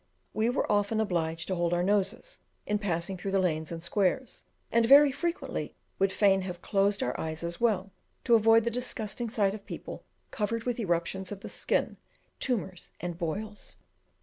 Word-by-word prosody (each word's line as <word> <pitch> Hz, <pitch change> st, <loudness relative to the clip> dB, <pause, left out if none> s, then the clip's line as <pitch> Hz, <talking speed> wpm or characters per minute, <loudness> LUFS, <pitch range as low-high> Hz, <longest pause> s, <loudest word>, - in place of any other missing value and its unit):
We 220 Hz, +2 st, +1 dB
were 245 Hz, -, 0 dB
often 205 Hz, +1 st, +2 dB
obliged 165 Hz, -5 st, -1 dB
to 190 Hz, -, -1 dB
hold 175 Hz, -1 st, +1 dB
our 175 Hz, -, +1 dB
noses 205 Hz, -, 0 dB, 0.3 s
in 210 Hz, 0 st, 0 dB
passing 185 Hz, -1 st, -1 dB
through 185 Hz, +2 st, -4 dB
the 195 Hz, -, +4 dB
lanes 160 Hz, -4 st, 0 dB
and 165 Hz, -1 st, -5 dB
squares, 205 Hz, +7 st, 0 dB, 0.3 s
and 230 Hz, 0 st, +4 dB
very 280 Hz, +4 st, +8 dB
frequently 340 Hz, +6 st, -3 dB, 0.2 s
would 195 Hz, 0 st, +3 dB
fain 195 Hz, -1 st, +3 dB
have 180 Hz, -2 st, -5 dB
closed 200 Hz, 0 st, +1 dB
our 125 Hz, -, -1 dB
eyes 160 Hz, +1 st, -3 dB
as 170 Hz, +3 st, -4 dB
well, 200 Hz, -4 st, +1 dB, 0.3 s
to 235 Hz, -, +3 dB
avoid 225 Hz, 0 st, +6 dB
the 235 Hz, -, -1 dB
disgusting 235 Hz, -1 st, -2 dB
sight 205 Hz, -4 st, +1 dB
of 210 Hz, -1 st, -8 dB
people -, -, -8 dB, 0.3 s
covered 225 Hz, +2 st, -2 dB
with 245 Hz, 0 st, -2 dB
eruptions 185 Hz, -1 st, -1 dB
of 200 Hz, -1 st, -6 dB
the -, -, -7 dB
skin, -, -, -1 dB, 0.4 s
tumours, 190 Hz, -8 st, -2 dB
and 175 Hz, -1 st, -5 dB
boils. 205 Hz, +5 st, -5 dB
200 Hz, 175 wpm, -29 LUFS, 175-225 Hz, 0.4 s, very